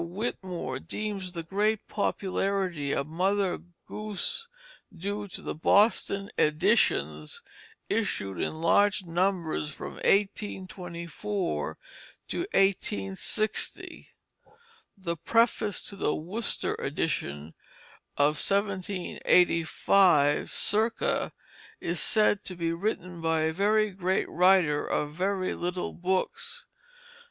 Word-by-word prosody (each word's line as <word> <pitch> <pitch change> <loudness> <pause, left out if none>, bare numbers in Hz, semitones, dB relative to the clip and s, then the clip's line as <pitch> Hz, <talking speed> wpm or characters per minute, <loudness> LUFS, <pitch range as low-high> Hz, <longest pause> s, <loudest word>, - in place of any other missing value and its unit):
Whitmore 180 - -4
deems 195 0 -4
the 170 -2 -4
great 205 +5 0
popularity 190 -6 -1
of 140 - 0
"Mother 185 +4 0 0.3
Goose" 215 - -3 0.5
due 205 +4 -3
to 185 - -6
the - - -3
Boston 200 +3 +3
editions 80 - +2 0.4
issued 95 -3 -1
in - - -1
large 190 +5 +3
numbers 170 -3 0
from - - -8
1824 190 -2 -1 0.5
to - - -2
1860. 195 - 0 0.9
The 170 -3 -3
preface 225 +1 +2
to 200 - -7
the 190 - 0
Worcester 195 +9 -1
edition 75 +3 -2 0.6
of 150 +1 +3
1785 180 -4 +3
circa 220 +2 +1 0.5
is 170 -1 -2
said 210 +2 +3
to 185 - -6
be 165 -1 -1
written 180 -2 -3
by 160 -1 +1
a 160 0 +1
very 210 +3 +2
great 185 0 0
writer 180 -4 +4
of 150 0 -1
very 185 +2 0
little 180 +1 -3
books. 190 - -2
185 Hz, 95 wpm, -28 LUFS, 165-205 Hz, 0.9 s, writer